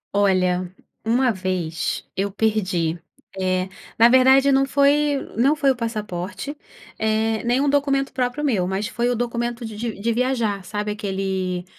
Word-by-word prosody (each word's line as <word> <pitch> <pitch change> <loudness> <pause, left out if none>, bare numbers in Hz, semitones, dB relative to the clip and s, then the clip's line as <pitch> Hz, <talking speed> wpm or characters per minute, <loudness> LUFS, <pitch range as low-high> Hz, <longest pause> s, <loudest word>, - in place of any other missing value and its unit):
Olha, 185 -2 +2 0.3
uma 245 +3 +2
vez 185 -5 -3
eu 200 +1 -1
perdi, 185 -6 0 0.3
eh, 185 -1 0 0.3
na 230 +1 +7
verdade 265 +2 +6
não 270 0 +4
foi 285 +2 +3 0.2
não 270 +7 +3
foi 280 -3 +3
o - - -1
passaporte, 220 +3 -4 0.4
eh, 220 0 +1
nem 240 +2 +2
um 285 - +1
documento 275 -1 +1
próprio 255 +3 -1
meu, 205 -10 +1
mas 190 +3 -2
foi 235 +2 -1
o 245 - +1
documento 240 0 -2
de 220 -1 -7
de 225 0 -4
de 230 +3 0
viajar, 235 -5 0
sabe, 210 +2 -3
aquele 190 -3 -3
220 Hz, 155 wpm, -22 LUFS, 190-255 Hz, 0.4 s, na